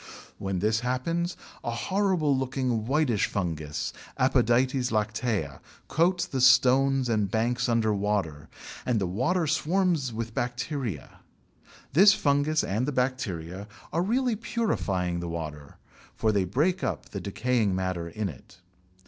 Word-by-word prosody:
When 95 -1 -2
this 105 +4 +1
happens 165 +9 -1 0.3
a - - -2
horrible 175 - +1
looking 130 -4 -1
whitish 135 -6 +2
fungus 80 -5 -3 0.2
(Apodytes 130 0 +2
lactea) 105 - -1 0.3
coats 175 +3 +2
the 130 - -3
stones 130 +1 +5
and 105 -4 +1
banks 120 +3 0
under 115 -2 +2
water 100 -7 -2 0.3
and 120 -3 +1
the 95 - 0
water 130 - 0
swarms 160 -2 +1
with 115 0 -5
bacteria. 120 - -4 0.7
This 195 +6 +7
fungus 145 +2 +2
and 110 +7 -1
the - - 0
bacteria 100 - -2 0.3
are 165 - +2
really 240 +5 +1
purifying 100 - -1
the 85 0 -4
water, 75 -3 -6 0.4
for 110 - +1
they 100 -3 +1
break 160 - 0
up - - -3
the 100 - -5
decaying 105 +1 0
matter 90 -2 -2
in 105 +4 -3
it. 80 +1 -11
120 Hz, 130 wpm, -27 LUFS, 100-140 Hz, 0.7 s, This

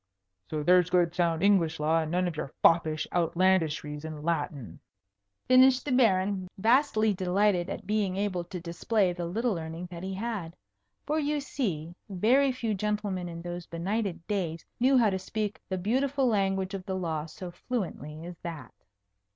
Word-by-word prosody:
So 150 -1 -2
there's 180 +1 +5
good 175 -2 +2
sound 170 -1 +1
English 175 -6 +3
law, 155 +2 +2
and 160 -1 -2
none 180 +1 +1
of 170 - -4
your 145 -2 -4
foppish 160 -2 +3
outlandishries 165 -4 +1
in 155 -2 -7
Latin," 145 - -3 0.7
finished 255 +1 +6
the 290 - -2
Baron, 195 -6 +2
vastly 220 0 +3
delighted 185 0 +1
at 195 - -6
being 205 -2 0
able 195 -3 -1
to 180 +1 -6
display 180 +3 0
the 175 -1 -4
little 225 +6 0
learning 165 +1 -6
that 170 -1 -7
he 190 +1 -4
had. 200 -6 -4 0.5
For 305 +2 0
you 295 0 0
see, 175 - -3 0.2
very 245 +9 +3
few 235 -4 -2
gentlemen 205 -3 -2
in 170 0 -7
those 175 0 -6
benighted 185 +1 -3
days 170 -6 -2
knew 260 +2 +4
how 225 -4 +4
to 190 - -1
speak 210 +1 -4
the 190 - -1
beautiful 265 +8 +1
language 195 -4 +1
of 195 -2 -4
the 190 - -2
law 165 -4 -2
so 175 +2 -8
fluently 170 - -5
as 175 -1 -9
that. 160 -8 -7
185 Hz, 165 wpm, -28 LUFS, 170-215 Hz, 0.7 s, finished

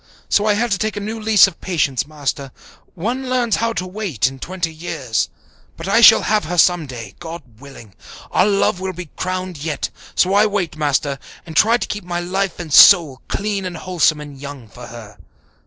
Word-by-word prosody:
So 210 +1 +2
I 210 - +3
had 235 +2 -1
to 200 - +1
take 215 -1 -2
a - - -1
new 215 +2 -5
lease 215 -2 +5
of 195 -4 -7
patience, 145 -8 -1
Master. 140 -2 -4 0.4
One 245 +9 -3
learns 245 -3 +1
how 230 0 0
to 185 - -3
wait 185 - -3
in 135 0 -2
twenty 175 +1 -4
years. 155 -8 -3 0.5
But 165 - -7
I 225 +4 +3
shall 225 -1 +8
have 210 -5 +1
her 175 +3 -4
some 175 -2 +3
day, 120 -4 -8
God 170 -1 -8 0.2
willing. 135 -7 -13 0.4
Our 185 - +3
love 200 -2 +1
will 190 0 -4
be 175 -3 -9
crowned 185 -1 -4
yet. 155 -2 -3 0.2
So 185 +1 +2
I 210 +2 +4
wait, 200 -5 -2
Master, 145 -2 -1 0.3
and 160 - -10
try 225 +8 +4
to - - -4
keep 210 -1 -5
my 175 0 -3
life 190 +2 -2
and 165 -4 -6
soul 155 -10 +7
clean 200 -1 -2
and 180 -2 -5
wholesome 170 -4 +1
and 145 -2 -10
young 140 -4 -9
for 125 +4 -11
her. 115 -3 -12
175 Hz, 205 wpm, -19 LUFS, 145-205 Hz, 0.5 s, shall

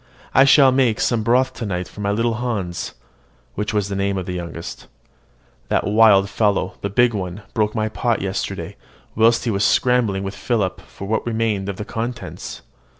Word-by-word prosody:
"I 135 - +6
shall 135 -1 +6
make 130 -4 +2
some 120 -2 +1
broth 125 +4 +2
to 125 - -7
night 90 -4 -3
for 105 - -10
my 100 - -1
little 115 +3 +1
Hans 100 -8 -3 0.6
(which 105 +1 -2
was 105 -3 0
the 100 - -4
name 100 0 0
of 95 - -3
the 90 - -4
youngest): 85 -1 -7 0.8
that - - +1
wild 105 -2 +5
fellow, 105 -2 0
the 100 - -2
big 120 +4 +3
one, 95 0 -5
broke 105 -1 0
my 110 -1 0
pot 115 +1 -1
yesterday, 95 0 -4 0.4
whilst 115 +2 +3
he 115 - +1
was 100 0 0
scrambling 115 -7 +2
with 95 0 -4
Philip 100 -3 -1
for 100 - -10
what 110 +2 0
remained 110 -4 -1
of 100 - -3
the 105 - -6
contents." 120 +3 -6
105 Hz, 185 wpm, -21 LUFS, 100-115 Hz, 0.8 s, I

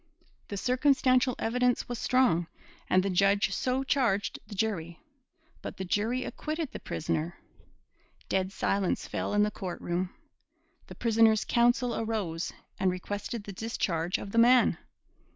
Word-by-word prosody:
The 200 - -5
circumstantial 255 +1 +3
evidence 250 +1 +1
was 245 -1 -4
strong, 190 -12 +2 0.4
and 185 0 +4
the 195 - 0
judge 195 +2 +3
so 255 +6 0
charged 240 -8 0
the 205 - -8
jury. 180 -6 -2 0.6
But - - -7
the 190 - -4
jury 225 +7 0
acquitted 310 +1 -4
the - - -7
prisoner. 165 +1 -3 0.9
Dead 190 0 0
silence 195 -1 -1
fell - - -3
in 205 - +5
the 210 - +1
court 185 -4 -6
room. 180 +1 -2 0.8
The - - -10
prisoner's 225 -2 +3
counsel 240 +1 +2
arose 205 -7 -2 0.3
and 190 - +3
requested 205 +4 -4
the 200 - -8
discharge 180 -5 -1
of 200 - -7
the 230 - +2
man. 245 +2 +5
210 Hz, 140 wpm, -29 LUFS, 185-245 Hz, 0.9 s, in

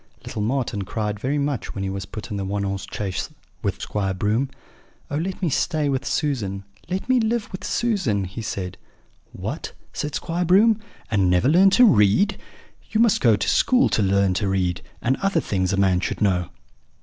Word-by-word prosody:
"Little 105 - -4
Marten 115 -2 -1
cried 105 +1 -3
very 135 +6 -1
much 140 -3 -2
when 95 - -3
he 95 - -2
was 95 -1 -5
put 110 - -8
into 105 - -2
the - - -3
one 100 +1 -2
horse 100 0 -3
chaise 95 -3 -3 0.3
with - - -2
Squire 95 -2 -2
Broom. 110 +8 0 0.6
"'Oh, 145 - 0
let 180 +4 -3
me 175 - +2
stay 155 0 +1
with 135 0 -1
Susan! 105 -11 -1 0.3
let 185 +4 -3
me 255 -1 +4
live 225 0 -1
with 185 - -7
Susan!' 190 - 0
he 95 +5 -6
said. 95 -4 -5 0.5
"'What!' - - -5 0.2
said 150 -1 -3
Squire 170 +2 -2
Broom, 210 +5 +5 0.3
'and 100 -4 +3
never 90 +7 +3
learn 180 +6 +6
to 250 - +8
read? 170 - +4 0.5
You 220 - 0
must 230 -3 +4
go 115 -4 +5
to 100 - -2
school 255 0 +4
to - - +1
learn 100 -1 +3
to 100 +2 -1
read, 90 -2 0 0.2
and 130 +3 +2
other 195 -3 +1
things 95 - -1
a 100 - 0
man 95 -2 +3
should - - -3
know.' 90 -4 +1
110 Hz, 195 wpm, -23 LUFS, -, 0.6 s, to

